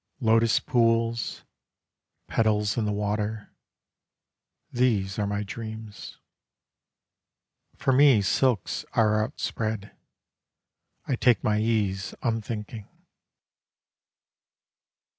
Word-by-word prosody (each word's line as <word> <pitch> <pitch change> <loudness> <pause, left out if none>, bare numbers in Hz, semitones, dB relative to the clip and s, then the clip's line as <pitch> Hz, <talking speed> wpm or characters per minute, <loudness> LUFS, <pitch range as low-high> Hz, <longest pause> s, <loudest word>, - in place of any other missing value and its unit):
Lotus 115 -2 +3
pools: 115 -1 0 0.8
Petals 105 -2 +1
in 115 - 0
the 105 - 0
water. 105 +1 -3 1.2
These 110 -6 0
are 105 - 0
my 100 +1 -2
dreams. 110 0 -8 1.6
For 135 - +1
me 130 -6 +6
silks 120 0 +1
are 110 -1 +3
outspread. 110 -3 -4 1.1
I 130 - 0
take 120 -3 +3
my 105 0 +1
ease, 105 -4 -1
unthinking. 110 -2 -3
110 Hz, 80 wpm, -26 LUFS, 105-115 Hz, 1.6 s, me